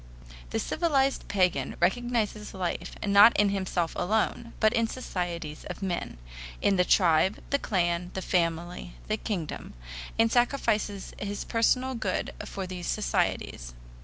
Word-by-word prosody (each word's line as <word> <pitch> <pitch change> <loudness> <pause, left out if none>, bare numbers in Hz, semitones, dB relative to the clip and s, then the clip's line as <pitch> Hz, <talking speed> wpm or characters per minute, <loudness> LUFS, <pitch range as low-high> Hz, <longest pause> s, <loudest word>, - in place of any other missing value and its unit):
The - - -2
civilized 275 -5 +1
pagan 185 -2 +1
recognizes 215 +1 0
life 180 -2 -3
not 205 +3 +7
in 205 -1 +4
himself 185 -4 -1
alone, 220 +4 0
but 215 -1 +4
in 230 0 +2
societies 175 -10 -4
of - - -6
men 175 - -3 0.4
in 200 - +3
the 180 - +4
tribe, 180 +1 +4
the 280 - +3
clan, 175 -4 0
the 190 - -3
family, 175 0 -1
the 215 - 0
kingdom 180 - -4 0.4
and 225 0 +4
sacrifices 225 -5 +1
his 205 0 -3
personal 255 +3 +1
good 210 -6 -2
for 195 -1 -5
these 180 -1 -6
societies. - - -1
195 Hz, 130 wpm, -28 LUFS, 175-225 Hz, 0.4 s, not